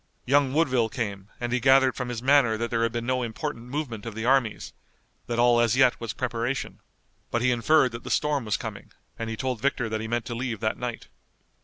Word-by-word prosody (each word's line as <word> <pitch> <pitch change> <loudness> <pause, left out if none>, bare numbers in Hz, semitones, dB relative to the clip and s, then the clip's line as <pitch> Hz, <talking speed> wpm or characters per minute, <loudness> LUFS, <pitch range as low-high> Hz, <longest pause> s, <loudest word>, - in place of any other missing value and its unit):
Young 140 0 +3
Woodville 130 -8 +2
came, 100 -4 -4
and 120 0 -2
he 125 - +2
gathered 130 +1 +5
from 125 -2 -4
his 120 -1 -5
manner 135 -5 +4
that 115 +1 -3
there 115 -1 +1
had 115 0 +1
been 120 0 -3
no 130 +1 0
important 120 +1 -4
movement 125 -6 -4
of 115 - -6
the 110 0 -4
armies, 125 -4 +1 0.5
that 120 - -2
all 120 0 +5
as 120 +1 +2
yet 130 -3 +4
was 115 - -3
preparation. 125 +1 -3 0.5
But 120 0 -1
he 125 - +3
inferred 125 +3 +3
that 115 +1 -8
the - - -7
storm 145 -4 +1
was 105 - 0
coming, - - -8 0.3
and 115 0 -3
he 115 - -4
told 125 -3 -2
Victor 125 -4 0
that 110 0 -2
he 110 - -4
meant 120 0 -1
to 120 - -5
leave 120 -2 -3
that 110 -1 -1
night. 125 -2 -5
120 Hz, 225 wpm, -26 LUFS, 115-130 Hz, 0.5 s, gathered